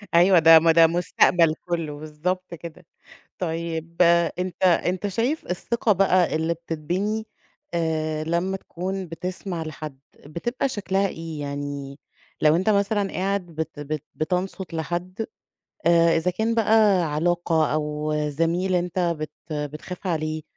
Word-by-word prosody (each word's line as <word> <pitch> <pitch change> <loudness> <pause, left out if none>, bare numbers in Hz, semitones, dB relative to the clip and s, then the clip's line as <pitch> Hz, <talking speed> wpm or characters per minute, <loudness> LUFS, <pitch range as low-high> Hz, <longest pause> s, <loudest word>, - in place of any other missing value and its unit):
أيوه 175 +1 +6
ده 165 0 +9
ما 165 +1 +4
ده 165 0 +7
مستقبل 170 -1 +3 0.2
كُلّه 165 -4 -2
بالضبط 170 +5 -3
كده. 170 +1 -10 0.5
طيب 165 -1 -3 0.4
أنت 185 0 -4
أنت 185 +2 +2
شايف 235 +10 -1
الثقة 220 +5 0
بَقى 185 -3 +3
اللي 160 +1 0
بتتبني 175 +7 -3 0.5
آآ، 155 -2 -1
لمّا 170 +4 -1
تكون 190 +1 -5
بتسمع 175 +1 -4
لحد 155 -3 -7 0.3
بتبقى 240 - -2
شكلها 195 -3 0
إيه؟ 165 -4 -6
يعني 140 -1 -5 0.4
لو 155 0 +5
أنت 185 +5 +1
مثلًا 200 -1 +1
قاعد 195 0 -1
بت 160 -2 -6
بت 150 0 -4
بتنصت 180 +2 -2
لحد 175 +6 -3 0.6
آآ، 170 -1 +5
إذا 165 +2 +1
كان 220 +5 -1
بَقى 215 -4 +4
علاقة 165 -1 +1
أو 150 0 -1
زميل 165 +5 0
أنت 180 0 -1 0.2
بت 155 - -4 0.2
بتخاف 150 +6 -5
عليه 155 -2 -2
170 Hz, 130 wpm, -24 LUFS, 155-185 Hz, 0.6 s, ده